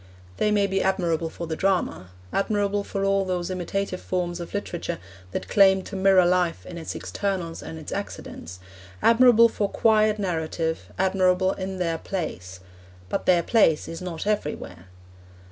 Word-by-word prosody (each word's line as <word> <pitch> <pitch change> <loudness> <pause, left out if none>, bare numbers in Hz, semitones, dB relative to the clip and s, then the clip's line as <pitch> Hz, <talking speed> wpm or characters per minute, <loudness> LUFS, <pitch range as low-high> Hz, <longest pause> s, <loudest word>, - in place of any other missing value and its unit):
They 210 - +2
may 205 -1 +3
be 195 0 0
admirable 170 -4 0
for 170 - -6
the 160 -1 -3
drama, 185 - 0 0.2
admirable 205 0 0
for 195 -1 -3
all 195 0 +2
those 180 -1 -2
imitative 185 +1 -3
forms 175 -1 -2
of 170 - -7
literature 180 -4 -3 0.3
that - - -4
claim 190 -1 +5
to 200 - -8
mirror 190 -1 +5
life 180 -1 +1
in 170 - -7
its 160 - -6
externals 185 -5 -3
and 160 - -8
its 155 - -8
accidents, 90 - -6 0.4
admirable 230 0 +7
for 205 -3 -2
quiet 215 -1 +3
narrative, 165 -4 -2
admirable 185 0 +2
in 190 0 -5
their 165 -3 -1
place; 95 - -5 0.5
but - - -3
their 175 -2 +5
place 165 -9 +3
is 165 - -7
not 180 -2 -5
everywhere. 150 - -3
185 Hz, 155 wpm, -25 LUFS, 170-200 Hz, 0.5 s, admirable